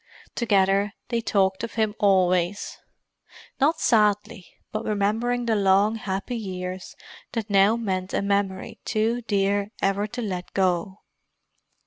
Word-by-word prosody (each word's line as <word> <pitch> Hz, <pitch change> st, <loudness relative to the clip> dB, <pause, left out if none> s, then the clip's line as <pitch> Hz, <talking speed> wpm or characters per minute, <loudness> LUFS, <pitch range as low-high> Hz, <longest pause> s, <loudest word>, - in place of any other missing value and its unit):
Together, 200 Hz, -2 st, +2 dB, 0.2 s
they 235 Hz, -1 st, 0 dB
talked 190 Hz, -3 st, +1 dB
of 230 Hz, -, -5 dB
him 220 Hz, -2 st, +1 dB
always; 185 Hz, -1 st, +2 dB, 0.8 s
not 310 Hz, +4 st, +2 dB
sadly, 210 Hz, -3 st, +2 dB, 0.2 s
but 215 Hz, +1 st, -3 dB
remembering 225 Hz, +4 st, 0 dB
the 225 Hz, -1 st, +1 dB
long, 200 Hz, +1 st, +3 dB
happy 205 Hz, +2 st, -4 dB
years 185 Hz, -3 st, -6 dB, 0.4 s
that 225 Hz, -3 st, -3 dB
now 200 Hz, +2 st, +5 dB
meant 190 Hz, -5 st, -3 dB
a -, -, -1 dB
memory 200 Hz, -1 st, -1 dB
too 225 Hz, +2 st, 0 dB
dear 200 Hz, 0 st, +1 dB
ever 195 Hz, +1 st, 0 dB
to 245 Hz, +3 st, -5 dB
let 180 Hz, -4 st, -4 dB
go. 190 Hz, +1 st, 0 dB
200 Hz, 125 wpm, -24 LUFS, 190-220 Hz, 0.8 s, now